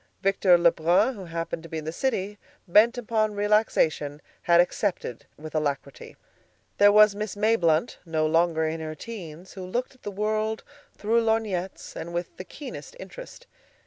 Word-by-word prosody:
Victor 195 -2 +4
Lebrun, 170 +7 +3
who 195 -5 -9
happened 165 -1 -4
to 165 - -12
be 160 - -4
in 155 - -6
the 160 - -3
city, 205 -1 -2 0.3
bent 225 +7 +5
upon 215 -3 0
relaxation, 205 -8 +1 0.2
had 170 0 +4
accepted 175 - -1
with 155 +1 -9
alacrity. 145 -3 -3 0.6
There 205 0 +7
was 210 0 +7
a - - -11
Miss 210 -1 -4
Mayblunt, 205 -3 +2
no 160 -2 -1
longer 165 0 +2
in 160 +1 -3
her 155 0 -5
teens, 180 -3 -9
who 190 - -8
looked 240 +9 -3
at 255 - -25
the - - -5
world 215 +2 -1 0.3
through 230 +2 +1
lorgnettes 215 -5 -2
and 170 +1 -6
with 175 0 -4
the - - -6
keenest 285 - -9
interest. - - -10
190 Hz, 165 wpm, -26 LUFS, 165-215 Hz, 0.6 s, There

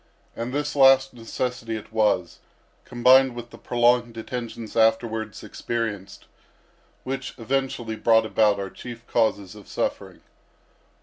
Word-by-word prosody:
And 115 +2 -4
this 145 +2 -2
last 135 -1 +5
necessity 120 0 -4
it 110 0 -9
was, 105 -6 +1 0.5
combined 130 +1 +4
with 120 0 -8
the - - -12
prolonged 120 -1 +2
detections 115 -1 -6
afterwards 110 -1 +1
experienced, 105 -5 -5 0.8
which 135 0 -5
eventually 125 -2 -2
brought 110 0 +4
about 105 -2 +2
our 100 -1 -5
chief 120 -1 -10
causes 105 -5 0
of 105 -2 -14
suffering. - - -4
115 Hz, 120 wpm, -24 LUFS, 110-125 Hz, 0.8 s, last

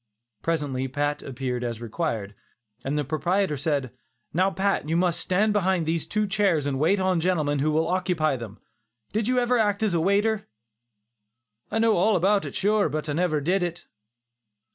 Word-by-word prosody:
Presently 145 -5 -1
Pat 145 +2 -1
appeared 125 -2 -4
as 120 -2 -3
required, 115 -4 -3 0.5
and 140 +3 -1
the 150 - +1
proprietor 155 +5 0
said: 140 -3 -1 0.4
"Now 185 +3 +3
Pat, 195 -5 -1
you 165 - +2
must 175 -1 +1
stand 205 +5 +1
behind 190 -4 +1
these 160 0 -1
two 215 0 0
chairs 195 -7 +1
and 135 -2 -1
wait 180 +7 +3
on 185 -2 +1
the - - -2
gentlemen 155 -6 +1
who 150 +3 +1
will 160 +1 +1
occupy 175 -5 +1
them; 115 -4 -8 0.6
did 215 +1 0
you 255 0 +1
ever 245 0 +2
act 205 -1 +1
as 210 -4 +1
a 170 - +2
waiter?" 205 +4 +1 1.2
"I 215 - -2
know 225 -2 +3
all 205 +4 +3
about 195 +3 +2
it - - -7
sure, 205 -2 +2
but 155 +1 -3
I - - 0
never 165 -1 +1
did 180 +7 +1
it." 175 -1 -4
170 Hz, 185 wpm, -25 LUFS, 145-200 Hz, 1.2 s, Now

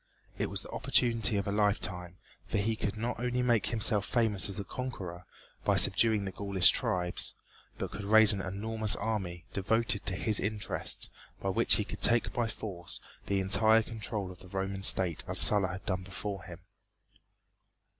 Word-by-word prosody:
It - - -1
was - - -3
the - - -12
opportunity 115 -2 +2
of 100 - -2
a - - -1
lifetime, 100 -4 -2 0.3
for - - -2
he 110 +2 0
could 105 -1 -4
not 115 +1 -4
only 125 +1 -1
make 120 -3 +1
himself 110 -3 +2
famous 105 -4 0
as 95 - -5
a - - -3
conqueror 90 -6 -7 0.4
by - - +1
subduing 110 -3 +4
the 95 - -4
Gaulish 100 -1 +3
tribes, 90 -1 -1 0.4
but - - -5
could 100 +1 -7
raise 110 +1 +7
an 100 - -4
enormous 110 +3 -2
army, 95 -5 -4
devoted 105 +1 -1
to 95 - -1
his 105 +2 0
interests, 105 +1 -2 0.3
by - - -3
which - - +4
he - - -1
could - - -9
take 120 0 +4
by 120 -1 -1
force 95 -5 -5 0.3
the 100 -1 0
entire 110 +4 +3
control 110 -4 -4
of 90 - -14
the 95 - -15
Roman 95 +1 -4
State 90 -4 +5
as - - 0
Sulla 100 -3 +6
had 90 +1 -8
done 95 -1 -2
before 95 -1 -7
him. 90 0 -11
100 Hz, 175 wpm, -30 LUFS, 95-110 Hz, 0.4 s, raise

